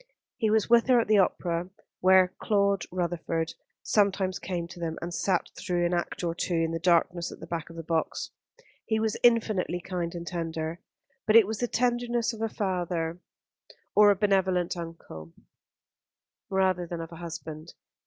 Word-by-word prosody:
He 225 -4 +1
was 215 -1 +2
with 235 0 +5
her 250 -2 +5
at 230 - 0
the 215 -1 +5
opera, 175 -2 0 0.3
where 185 0 +5
Claude 200 -3 +2
Rutherford 170 -2 -2 0.3
sometimes 195 -3 +1
came 175 -2 -3
to 175 - -11
them 165 -1 -3
and 170 0 -5
sat 185 0 0
through 175 -1 -1
an 175 - 0
act 175 +1 -2
or 170 -1 0
two 175 +1 -2
in 165 0 +1
the 165 - -2
darkness 175 0 +2
at - - -11
the - - -8
back 165 -2 -5
of 165 - -11
the 165 - -6
box. 160 0 -2 0.6
He 220 -1 +1
was 220 -1 0
infinitely 215 -7 +2
kind 175 -1 -4
and 170 0 -5
tender; 165 -1 -4 0.5
but 215 - +4
it 230 -3 +9
was 215 +1 -4
the 245 - 0
tenderness 240 -1 0
of 220 - -8
a 225 - 0
father, 175 -4 -2 0.8
or 210 0 +7
a 200 - +5
benevolent 190 -3 +1
uncle, 165 - -9 1.2
rather 185 -2 +1
than 170 0 -5
of 165 0 -7
a 165 - -9
husband. 160 -1 -7
180 Hz, 175 wpm, -28 LUFS, 170-205 Hz, 1.2 s, it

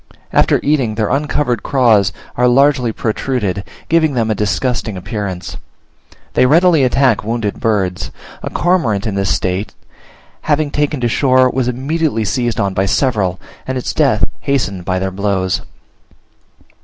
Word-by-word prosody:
After - - +3
eating, 135 -7 +1
their 105 -1 0
uncovered 140 -3 0
craws 115 -8 +3 0.2
are 125 0 +3
largely 130 -1 +3
protruded, 110 -4 -2 0.2
giving 160 -3 +2
them 115 -2 +1
a - - +3
disgusting 110 +1 -1
appearance. 95 -2 -5 0.8
They 125 - +4
readily 165 0 +4
attack 130 -2 +2
wounded 110 -2 -2
birds: 95 -6 -1 0.3
a - - -4
cormorant 145 - +1
in 110 - -2
this 100 0 0
state 95 +3 -2 0.7
having 150 -1 0
taken 145 -2 -1
to - - 0
the - - +2
shore, 130 -2 +3
was 130 -2 -1
immediately 135 -1 -1
seized 120 +1 -1
on 100 -3 0
by 95 +1 0
several, 95 -7 0 0.3
and 130 0 -2
its 125 - -3
death - - +2 0.2
hastened 100 -10 -1
by 90 0 0
their 95 +1 -2
blows. 95 -2 -1
120 Hz, 145 wpm, -16 LUFS, 100-135 Hz, 0.8 s, They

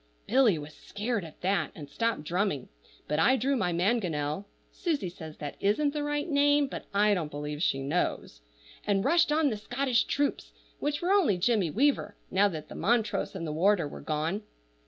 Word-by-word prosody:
Billy 240 -7 +4
was 150 0 -8
scared 210 0 -3
at 160 -2 -12
that 180 -4 +1
and 145 - -8
stopped 230 +3 -1
drumming, 170 -4 -1 0.4
but 150 +1 0
I 260 +11 +5
drew 270 +3 +1
my 180 -8 0
mangonel 175 -3 0 0.2
(Susie 305 - -2
says 160 -3 -10
that 145 -1 -6
isn't 280 +9 +1
the 300 - -2
right 295 +2 -1
name, 290 -1 +4
but 270 - -7
I 205 +1 +4
don't 170 -6 -1
believe 150 0 -5
she 135 -5 +1
knows) 140 - -2 0.4
and 200 -2 +1
rushed 340 -2 +4
on 300 -2 +3
the 215 - -2
Scottish 245 +2 0
troops, 285 0 -1 0.3
which 295 +2 -2
were 360 - +1
only 370 - +4
Jimmy 200 -2 +2
Weaver, 225 - +1 0.2
now 195 +2 +4
that 160 -6 -6
Montrose 220 +2 0
and 170 -3 -4
the 155 - -3
warder 175 0 +3
were - - -9
gone. 160 +6 -2
205 Hz, 180 wpm, -29 LUFS, 160-265 Hz, 0.4 s, I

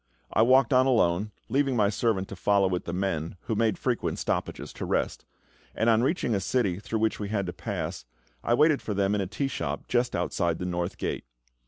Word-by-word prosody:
I - - +4
walked 130 +2 +5
on 130 +1 +5
alone, 105 -5 +2 0.2
leaving 135 +2 +1
my 105 -3 +3
servant 100 -2 0
to - - -6
follow 100 +1 +3
with 90 -1 -2
the - - -3
men, 90 -3 -2
who - - -3
made 110 0 +1
frequent 125 -3 -1
stoppages - - -3
to - - -5
rest; - - -1 0.5
and 115 +1 +3
on 110 0 +4
reaching 130 -3 +1
a 100 - +1
city 95 -2 0
through 110 +2 -3
which 110 0 0
we 105 -1 -4
had 100 -2 -1
to 90 - -4
pass, - - -4 0.4
I 120 - +3
waited 150 +1 +4
for 105 - -3
them 100 0 +1
in 105 - +1
a 95 - -2
tea 135 +8 -2
shop - - -4
just 125 0 +1
outside 85 -1 0
the 90 - -4
North 90 0 -2
Gate. - - -3
105 Hz, 215 wpm, -27 LUFS, 95-120 Hz, 0.5 s, walked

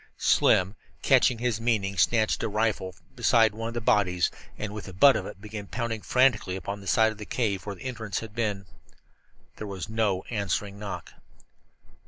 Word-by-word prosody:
Slim, 95 +2 +3 0.3
catching 125 - +4
his 115 -2 -1
meaning, 105 -5 0
snatched 110 +4 +2
a - - -1
rifle 105 -3 -1
from 90 -1 -26
beside 115 -2 +4
one 115 +1 -4
of 115 - -6
the 120 - -2
bodies, 90 -5 +2 0.3
and 105 -1 -5
with 105 - -7
the 95 - -9
butt 135 +9 +6
of - - -3
it - - -10
began 105 -1 -8
pounding 115 -1 -3
frantically 125 -8 +2
upon 100 +2 -5
the 100 - -11
side 110 +3 +4
of 110 - -11
the 105 - -6
cave 105 -6 -1
where 100 - -4
the - - -12
entrance 115 -6 -4
had 110 -2 -9
been. 105 -4 -2 0.9
There 105 - -6
was 95 -1 -6
no 110 -4 0
answering 100 -1 -2
knock. 105 -2 -7
105 Hz, 190 wpm, -27 LUFS, 100-115 Hz, 0.9 s, butt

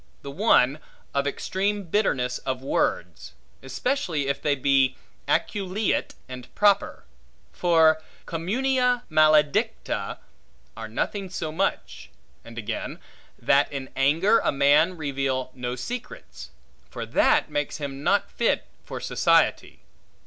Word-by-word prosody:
The 140 - -6
one, 145 - +3 0.3
of 140 0 0
extreme 200 +7 -2
bitterness 135 - 0
of 130 -1 -4
words, 135 - -2 0.3
especially 150 - -2
if 140 - -2
they 145 -2 +1
be 135 -1 +2 0.3
aculeate 200 +1 -1
and 125 -1 -9
proper; 200 -1 +2 0.5
for 160 -2 +3 0.2
cummunia 250 +8 0
maledicta 150 - +2 0.6
are 115 0 -7
nothing 190 - -3
so 165 -4 -4
much; 190 +5 -3 0.3
and 115 0 -13
again, 110 - -5 0.4
that 140 +1 +2
in 135 -2 -6
anger 160 +11 +3
a - - 0
man 145 +6 +3
reveal 135 -3 -2
no 125 -1 -4
secrets; 235 - -8 0.4
for - - -6
that, - - +2
makes 145 0 -2
him 140 -2 -6
not 200 +7 +1
fit 235 - 0 0.2
for - - -7
society. - - +1
150 Hz, 115 wpm, -25 LUFS, 135-195 Hz, 0.6 s, one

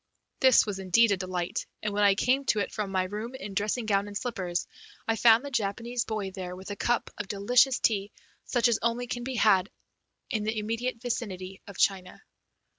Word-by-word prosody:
This 260 -2 +6
was 205 -3 -4
indeed 205 +4 +4
a 200 - +2
delight, 185 0 -3 0.2
and 210 -1 -1
when 205 - 0
I 200 -1 +5
came 255 +6 +2
to 215 - +2
it 200 - -2
from 210 -3 -3
my 185 -1 +1
room 210 +6 -5
in 200 -5 -7
dressing 215 +4 -1
gown 200 -1 +1
and 205 0 -4
slippers 185 -8 -3 0.4
I 225 - +2
found 230 +3 +5
the 285 - -6
Japanese 230 +1 -1
boy 210 -3 -3
there 185 -2 -6
with 190 +2 -8
a - - -3
cup 240 +3 0
of 205 - -3
delicious 245 +6 +3
tea 205 -2 +1 0.3
such 245 -2 +2
as 235 -2 +1
can 240 +1 -2
be 260 +1 -4
had 200 -4 +4
only - - -43 0.6
in 215 -2 0
the 220 +1 -2
immediate 230 +3 -2
vicinity 195 -6 -4
of 200 - -10
China. 185 -2 0
210 Hz, 200 wpm, -28 LUFS, 195-235 Hz, 0.6 s, This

